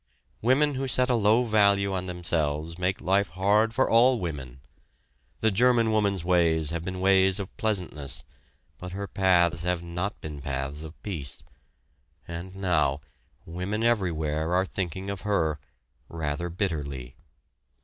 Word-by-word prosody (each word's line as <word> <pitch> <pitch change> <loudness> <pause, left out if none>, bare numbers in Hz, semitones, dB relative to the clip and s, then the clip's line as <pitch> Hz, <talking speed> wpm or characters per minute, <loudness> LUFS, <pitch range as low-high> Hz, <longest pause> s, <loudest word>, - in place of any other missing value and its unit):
Women 140 +5 +3
who 135 0 -2
set 125 +1 +2
a - - +3
low 110 +2 +4
value 100 -3 +3
on 95 -1 -2
themselves 85 -2 -2
make 90 +1 0
life 100 +1 +2
hard 100 +6 +2
for 130 +4 +2
all 120 +2 +5
women. 65 - -6 0.8
The 110 - +3
German 115 +1 +3
woman's 100 -5 +1
ways 85 -3 +2
have 85 -1 -3
been 95 +1 -4
ways 95 0 +4
of 100 -1 -7
pleasantness, 75 - -3 0.6
but 90 0 -7
her 100 +1 -4
paths 90 -4 +2
have 90 -1 -1
not 90 +4 -4
been 75 -2 -7
paths 70 +2 -4
of 80 0 -10
peace; 80 -10 -6 0.8
and 85 +3 -7
now, 85 -7 +1 0.4
women 90 +6 -3
everywhere 85 -7 0
are 95 +1 +2
thinking 95 +1 -4
of 100 - -6
her, 80 -8 0 0.5
rather 80 +1 -3
bitterly. 75 - -3
90 Hz, 140 wpm, -27 LUFS, 80-100 Hz, 0.8 s, all